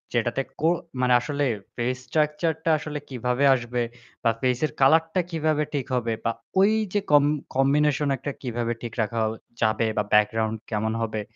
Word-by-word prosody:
যেটাতে 120 +3 +1 0.2
কো 160 - +3 0.3
মানে 125 -1 +3
আসলে 145 0 -1 0.3
ফেস 125 +2 -1
স্ট্রাকচার 155 +1 +1
টা - - +1
আসলে 150 -1 -5
কিভাবে 125 +1 -1
আসবে 120 0 -2 0.4
বা 115 - +4
ফেসের 130 +4 +1
কালার 160 +4 +6
টা 185 - +4
কিভাবে 155 -2 +1
ঠিক 140 -3 -1
হবে 115 -2 0
বা 115 - +1 0.3
ওই 200 +3 +5 0.2
যে 205 - +3
কম 145 -1 +7 0.3
কম্বিনেশন 145 +2 +3
একটা 140 +3 -4
কীভাবে 120 -2 -2
ঠিক 115 -2 -6
রাখা 115 +2 -1 0.4
যাবে 110 0 +2
বা 105 - +3
ব্যাকগ্রাউন্ড 110 +1 +3
কেমন 110 +1 0
হবে? 110 -1 -2
125 Hz, 165 wpm, -25 LUFS, 115-150 Hz, 0.4 s, কম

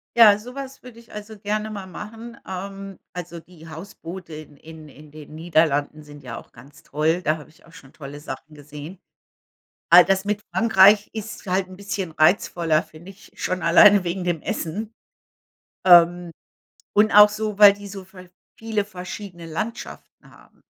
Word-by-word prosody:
Ja, 215 -3 +7
so 250 +4 -11
was 270 -1 -8
würde 245 -2 -14
ich 235 - -19
also 210 +1 -9
gerne 210 +1 -3
mal 200 -3 -7
machen. 225 +6 -10
Ähm, 195 +1 -7 0.2
also 175 -1 -7
die 165 -1 -17
Hausboote 170 +1 -10
in-in 155 +1 -12
in 150 +1 -16
den 155 0 -12
Niederlanden 155 -2 0
sind 145 -1 -14
ja 120 -3 -7
auch - - -13
ganz 140 +1 -17
toll. 160 +4 -1
Da 155 -2 0
habe 150 - -14
ich 155 - -24
auch 165 - -20
schon 135 -6 -16
tolle 145 -1 -10
Sachen 150 +2 -9
gesehen. 150 +5 -11 0.9
All 175 +1 +9
das 195 +1 0
mit 210 0 -2
Frankreich 205 -2 +5
ist 220 -1 -8
halt 185 0 -1
'n 185 - -12
bisschen 195 -3 -5
reizvoller, 160 0 +2
finde 170 +5 -14
ich, 195 - -19
schon 185 -1 -3
alleine 200 +3 +6
wegen 180 +1 -4
dem 175 -3 -2
Essen. 210 +7 -5 0.9
Ähm, 175 -1 +5 0.6
und 215 +2 +3
auch 210 0 +8
so, 210 -1 -4
weil 205 -1 +9
die 200 0 -11
so 195 -1 -9
ver 185 -1 -15 0.3
viele 220 -2 -2
verschiedene 180 -2 -9
Landschaften 215 +9 -7
haben. - - -22
185 Hz, 170 wpm, -22 LUFS, 160-205 Hz, 0.9 s, All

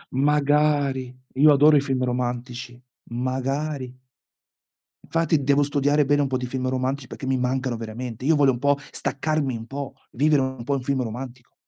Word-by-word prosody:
Magari! 145 -2 +2 0.2
Io 150 +3 +6
adoro 150 +2 +6
i 145 - +5
film 135 -3 -1
romantici, 125 -1 -3 0.3
magari! 130 +2 -2 1.1
Infatti, 165 -3 +1
devo 140 +1 +3
studiare 145 +1 +2
bene 145 +1 +3
un 140 - +1
po' 130 -1 -1
di 125 - -4
film 130 0 -2
romantici, 130 +1 -2
perché 135 - -8
mi 130 0 +1
mancano 125 0 -1
veramente, 115 +1 -6
io 160 +2 +4
voglio 140 -2 +4
un 120 - -4
po' 140 +1 +2
staccarmi 145 -3 -1
un 115 - -7
po', 140 -1 -5 0.2
vivere 145 +2 +3
un 130 -2 -3
po' 140 +3 -1
un 135 - -1
film 130 0 0
romantico. 120 +2 -8
135 Hz, 170 wpm, -24 LUFS, 125-145 Hz, 1.1 s, Io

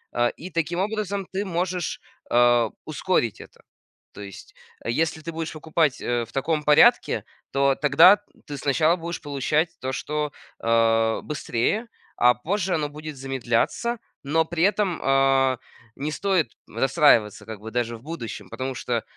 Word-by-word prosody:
Э, 120 0 +3
и 180 +3 -9
таким 170 +1 -1
образом 200 -1 -2
ты 195 +2 -2
можешь, 180 -1 -2 0.3
э, 120 -1 +4 0.2
ускорить 150 - -1
это. - - -15 0.5
То - - -10
есть, 100 -1 -11 0.3
э, 115 - 0
если 160 +4 0
ты 165 - -6
будешь 160 0 -4
покупать, 155 -2 0
э, 120 -1 -1
в - - -19
таком 150 +3 -1
порядке, 150 0 +5 0.3
то 140 0 +3
тогда 160 +9 +6 0.3
ты 145 - -6
сначала 155 +5 +2
будешь 170 -1 -6
получать 145 +3 0
то, 130 +1 -3
что, 150 +2 -3 0.3
э, 115 -1 +3
быстрее, 150 - -1 0.3
а 125 0 +5
позже 185 +7 -1
оно 150 -2 -1
будет 150 0 -8
замедляться, 135 - -1 0.3
но 160 +3 +1
при 170 0 -1
этом, 200 -3 +1
а, 135 -1 +3 0.4
не 145 +3 -3
стоит 175 -5 0 0.2
расстраиваться 115 -5 +3
как 110 -2 -7
бы 110 +1 -9
даже 120 -1 -2
в 115 - -20
будущем, 150 -8 -7
потому 130 0 -4
что, 120 -2 -2
145 Hz, 155 wpm, -24 LUFS, 120-170 Hz, 0.5 s, тогда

